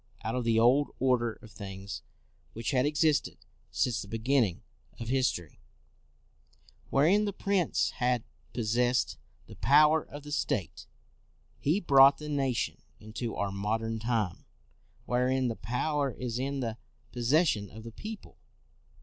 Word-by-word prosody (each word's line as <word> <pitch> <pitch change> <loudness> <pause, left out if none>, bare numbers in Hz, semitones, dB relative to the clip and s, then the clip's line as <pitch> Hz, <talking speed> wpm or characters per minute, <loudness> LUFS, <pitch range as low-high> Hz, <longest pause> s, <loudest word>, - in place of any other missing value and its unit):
Out 110 - -2
of 125 -1 -2
the 115 -1 +3
old 130 +5 +4
order 125 -3 +2
of 110 - -13
things 100 -1 -7 0.5
which 115 +4 -3
had 130 0 +2
existed 150 0 +1 0.3
since 125 -2 0
the 100 - -8
be 115 - -4
ginning 115 -6 +1 0.4
of 115 -1 -5
history, 125 - -1 1.3
wherein 180 +10 +4
the 205 - -1
prince 195 -3 0
had 125 -2 0 0.3
possessed 120 +2 0 0.3
the - - -13
power 150 +2 +5
of 145 0 -10
the 150 - -9
state, 105 - -2 0.7
he 160 +8 +1
brought 135 -5 +7
the 150 0 -7
nation 135 -4 -1 0.2
into 110 +2 -5
our 100 -1 -1
modern 110 +3 -2
time, 110 -5 -1 0.6
wherein 125 +1 +1
the 115 - -3
power 140 +6 -1
is 125 -1 -4
in 135 +1 -2
the 115 -2 -3 0.3
possession 120 - +2
of 110 +3 -11
the 115 - -8
peo 215 - -6
ple. - - -19
125 Hz, 140 wpm, -30 LUFS, 110-140 Hz, 1.3 s, brought